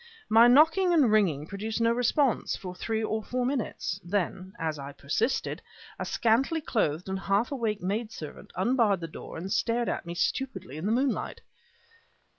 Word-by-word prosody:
My 225 +2 +7
knocking 325 +8 +5
and 275 -9 +4
ringing 175 -9 +2
produced 215 +6 -4
no 230 0 +3
response 245 +2 +1
for 180 -2 -7
three 220 +4 -2
or 220 0 -1
four 250 +3 -2
minutes; 245 -7 -2
then, 185 0 -2
as 155 -2 -3
I 140 +1 -7
persisted, 220 - -1 0.4
a - - -2
scantily 250 +8 +2
clothed 180 - -1
and 190 0 -2
half 200 +6 +1
awake 225 -8 -2
maid 215 +4 -2
servant 155 -8 -9
unbarred 205 -1 +2
the 165 - -4
door 160 - -9
and 185 +4 -5
stared 235 0 +1
at - - -3
me 170 - -5
stupidly 190 - -2
in 165 +6 -3
the - - +1
moonlight. 255 +3 0
215 Hz, 170 wpm, -28 LUFS, 185-245 Hz, 0.4 s, My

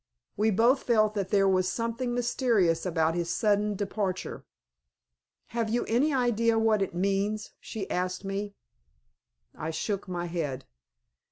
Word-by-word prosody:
We 215 +2 +2
both 235 +6 +4
felt 215 -3 +3
that 200 -3 -2
there 195 -2 +3
was 185 -1 +2
something 235 +2 -2
mysterious 230 -9 +1
about 160 -2 +1
his 170 0 -2
sudden 210 0 +1
departure. 195 -1 -3 1.0
"Have 230 -2 -1
you 240 +2 0
any 255 +7 +2
idea 230 -3 +2
what 220 -2 +3
it 190 -3 -2
means?" 200 +3 0
she 205 -4 -6
asked 185 +1 -2
me. 200 +1 -3 1.0
I 155 - -4
shook 200 +5 -3
my 175 -1 -3
head. 165 -6 -3
205 Hz, 140 wpm, -28 LUFS, 185-230 Hz, 1.0 s, both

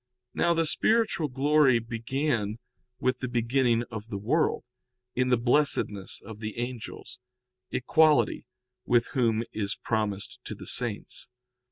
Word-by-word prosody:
Now 170 0 +2
the 165 0 +2
spiritual 215 -2 +2
glory 140 -1 +4
began 115 -1 -2 0.4
with 130 -1 0
the 130 - -3
beginning 120 0 +2
of 110 -1 -6
the 105 - -4
world, 120 +11 +1 0.5
in 125 0 +1
the 125 - +4
blessedness 120 -6 +1
of 110 -2 -9
the 110 0 -5
angels, 120 0 -6 0.5
equality 155 +4 +3 0.4
with 120 -1 +2
whom 115 -4 +2
is 100 -2 -2
promised 105 -3 -2
to - - -5
the - - -10
saints. - - -2
120 Hz, 130 wpm, -28 LUFS, 110-145 Hz, 0.5 s, glory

